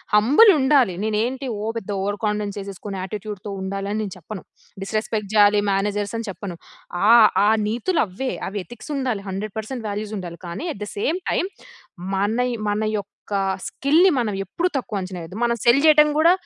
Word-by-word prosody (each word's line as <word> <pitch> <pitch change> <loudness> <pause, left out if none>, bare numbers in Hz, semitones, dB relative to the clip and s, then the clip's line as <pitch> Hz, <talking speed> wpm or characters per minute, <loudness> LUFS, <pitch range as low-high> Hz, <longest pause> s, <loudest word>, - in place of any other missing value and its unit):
Humble 280 - +7
ఉండాలి. 265 -8 +3
నేను 215 -1 0
ఏంటి 260 +2 -4
ఓ - - -4
పెద్ద 220 -3 -7
ఓవర్ 205 +1 -2
కాన్ఫిడెన్స్ 210 -1 -2
చేసేసుకొని, 200 0 -7
యాట్టిట్యూడ్‌తో 205 +1 -6
ఉండాలి 195 +1 -3
అని 215 - -1
నేను 195 -3 -5
చెప్పను. 185 +3 -8 0.4
డిస్రెస్పెక్ట్ 215 0 -2
చేయాలి 205 0 +6
మేనజర్స్ 205 +1 -1
అని 230 - -5
చెప్పను. 185 -2 -7 0.6
ఆహ్, 230 -3 +8 0.2
ఆ - - +4 0.2
నీతులు 245 - 0
అవ్వే. 220 +7 -4 0.2
అవి 205 +1 -4
ఎథిక్స్ 240 +4 -10
ఉండాలి. 250 -7 -1
100% 215 +5 -5
వాల్యూస్ 210 +1 -4
ఉండాలి. 170 -2 -8
కానీ, 170 - -5
అట్ 205 - -13
ద - - -10
సేమ్ 315 - 0
టైమ్ 370 - 0 0.6
మన 205 +5 +1
యొ 235 - -4
మన 210 +1 -1
యొక్క 200 -1 -6 0.6
స్కిల్‌ని 320 +7 +3
మనం 230 -4 0
ఎప్పుడు 340 - -1
తక్కువ 220 -6 -3
అంచనెయ్యోద్దు. 185 0 -7
మనం 235 0 +2
సెల్ 240 +3 +6
చేయడం 300 -1 +7
గూడా, 325 +2 +6
210 Hz, 170 wpm, -22 LUFS, 200-245 Hz, 0.6 s, ఆహ్